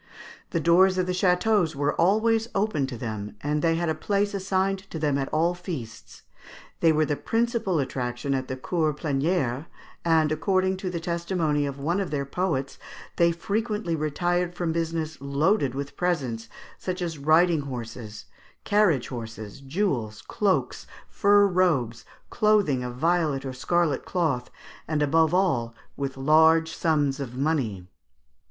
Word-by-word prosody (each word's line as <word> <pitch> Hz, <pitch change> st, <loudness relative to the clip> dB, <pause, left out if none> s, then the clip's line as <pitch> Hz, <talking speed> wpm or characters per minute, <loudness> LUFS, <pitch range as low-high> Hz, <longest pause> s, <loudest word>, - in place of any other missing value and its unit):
The 170 Hz, -, -1 dB
doors 185 Hz, +3 st, +4 dB
of 185 Hz, -, +1 dB
the 180 Hz, -, -2 dB
châteaux 180 Hz, -1 st, +2 dB
were 145 Hz, +1 st, 0 dB
always 220 Hz, +5 st, +2 dB
open 195 Hz, -9 st, 0 dB
to 125 Hz, -3 st, -6 dB
them, 110 Hz, -3 st, -5 dB
and 150 Hz, +1 st, -1 dB
they 165 Hz, 0 st, +2 dB
had 170 Hz, +1 st, -1 dB
a 160 Hz, -, +1 dB
place 200 Hz, +5 st, -1 dB
assigned 195 Hz, 0 st, 0 dB
to -, -, -6 dB
them 150 Hz, -3 st, 0 dB
at 135 Hz, -1 st, -1 dB
all 165 Hz, +3 st, +1 dB
feasts. 160 Hz, -, -8 dB, 0.6 s
They 165 Hz, -, +5 dB
were 155 Hz, 0 st, +2 dB
the 150 Hz, -, -1 dB
principal 225 Hz, -, 0 dB
attraction 130 Hz, -1 st, -2 dB
at 130 Hz, -1 st, -2 dB
the 130 Hz, -, -4 dB
Cours 155 Hz, +2 st, -1 dB
Plénières, 145 Hz, -2 st, -1 dB, 0.4 s
and, 160 Hz, -2 st, +3 dB
according 185 Hz, +3 st, +1 dB
to 185 Hz, 0 st, -4 dB
the 175 Hz, -2 st, -3 dB
testimony 170 Hz, -3 st, -1 dB
of 140 Hz, 0 st, -6 dB
one 170 Hz, +7 st, 0 dB
of 195 Hz, -, -2 dB
their 140 Hz, -2 st, -2 dB
poets, 140 Hz, -3 st, -2 dB, 0.4 s
they 170 Hz, 0 st, +4 dB
frequently 210 Hz, +1 st, -2 dB
retired 175 Hz, +3 st, -1 dB
from 175 Hz, -2 st, -1 dB
business 160 Hz, -1 st, -2 dB
loaded 140 Hz, -, +1 dB
with 140 Hz, +1 st, -5 dB
presents, 130 Hz, -11 st, -2 dB, 0.3 s
such 185 Hz, 0 st, -3 dB
as 165 Hz, -4 st, -4 dB
riding 160 Hz, +2 st, +4 dB
horses, 115 Hz, -5 st, -7 dB, 0.4 s
carriage 205 Hz, -, +2 dB
horses, 115 Hz, -2 st, -7 dB
jewels, 135 Hz, -, -2 dB
cloaks, 200 Hz, -3 st, -1 dB, 0.2 s
fur 205 Hz, 0 st, +4 dB
robes, 160 Hz, -, +1 dB, 0.3 s
clothing 210 Hz, -, +2 dB
of 125 Hz, 0 st, -5 dB
violet 155 Hz, -2 st, +1 dB
or 130 Hz, -, -4 dB
scarlet 155 Hz, +2 st, 0 dB
cloth, 155 Hz, -9 st, -1 dB, 0.4 s
and, 155 Hz, -2 st, 0 dB
above 160 Hz, +2 st, +3 dB
all, 140 Hz, -12 st, +1 dB, 0.2 s
with 135 Hz, -1 st, -4 dB
large 160 Hz, +3 st, +4 dB
sums 145 Hz, -4 st, +1 dB
of 125 Hz, -3 st, -6 dB
money. 130 Hz, -, -1 dB
160 Hz, 150 wpm, -26 LUFS, 135-180 Hz, 0.6 s, They